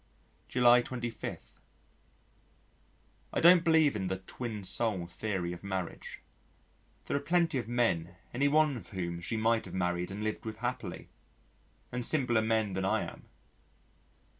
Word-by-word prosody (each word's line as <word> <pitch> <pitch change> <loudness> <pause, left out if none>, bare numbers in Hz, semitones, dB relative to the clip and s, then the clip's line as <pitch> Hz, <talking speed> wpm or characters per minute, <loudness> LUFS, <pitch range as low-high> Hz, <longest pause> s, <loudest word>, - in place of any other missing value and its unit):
July 125 -1 +5
25. 120 -3 -6 1.8
I - - +1
don't 175 0 +7
believe 160 -6 +4
in 95 -3 -2
the 95 0 -2
twin 105 +2 -6
soul 95 -1 +1
theory 90 -1 -3
of 90 - -10
marriage. 95 -3 -5 0.8
There - - -2
are - - +2
plenty 170 -1 +1
of 115 - -5
men 95 -8 0 0.2
any 140 +4 +2
one 150 -2 +3
of 100 - -10
whom 85 -2 -4
she 110 +6 -2
might 115 +1 +2
have - - -8
married 90 -1 -1
and 100 +2 -5
lived 110 0 -3
with 110 -1 -6
happily, 125 +1 -4 0.8
and 125 0 -3
simpler 120 -4 +2
men 110 -2 +1
than 95 +1 -2
I 95 - +1
am. - - -16
110 Hz, 145 wpm, -31 LUFS, 95-125 Hz, 1.8 s, don't